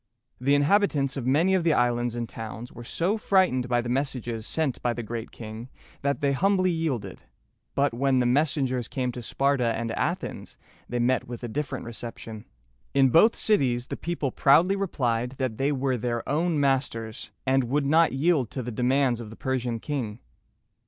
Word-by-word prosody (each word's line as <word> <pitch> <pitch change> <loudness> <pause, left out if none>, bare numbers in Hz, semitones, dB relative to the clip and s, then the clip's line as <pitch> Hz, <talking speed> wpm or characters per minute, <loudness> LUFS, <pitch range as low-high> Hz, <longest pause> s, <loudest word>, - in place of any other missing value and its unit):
The 140 +3 +3
inhabitants 145 -3 +2
of 130 -3 -3
many 160 +8 +3
of 185 -2 +2
the 165 -2 +3
islands 120 -1 +1
and 120 -1 -3
towns 115 +2 -7
were 120 - -10
so 180 - -1
frightened 180 - +2
by 120 -1 +2
the 120 - -6
messages 120 -4 -2
sent 155 -5 -1
by 120 - +1
The 120 - -5
Great 115 +1 -5
King, 110 +2 -9 0.3
that 140 +2 -1
they 140 -1 +2
humbly 185 +5 +2
yielded; 135 - -3 0.5
but 140 -2 +2
when 135 +2 +2
the 125 - +2
messengers 130 -2 +1
came 125 -2 -2
to 120 - -7
Sparta 125 -1 +1
and 115 0 -3
Athens, - - -3 0.3
they 120 - -2
met 120 +1 +1
with 120 0 -7
a - - -2
different 145 +5 -4
reception. 115 -2 -8 0.5
In 135 -1 +5
both 190 - +5
cities 125 - +2
the - - -3
people 165 -6 -3
proudly 165 +11 +4
replied 125 -10 -1
that 130 -5 -2
they 140 +2 +2
were 135 -2 0
their 120 0 -3
own 160 +2 +1
masters, 130 -5 -1 0.2
and 130 -1 +2
would 140 +4 0
not 160 +4 +4
yield 140 -3 +1
to 130 - -5
the 120 - -5
demands 125 +1 +1
of 115 -3 -7
the 110 - -10
Persian 125 -3 -2
king. 120 -7 -3
130 Hz, 180 wpm, -26 LUFS, 120-145 Hz, 0.5 s, In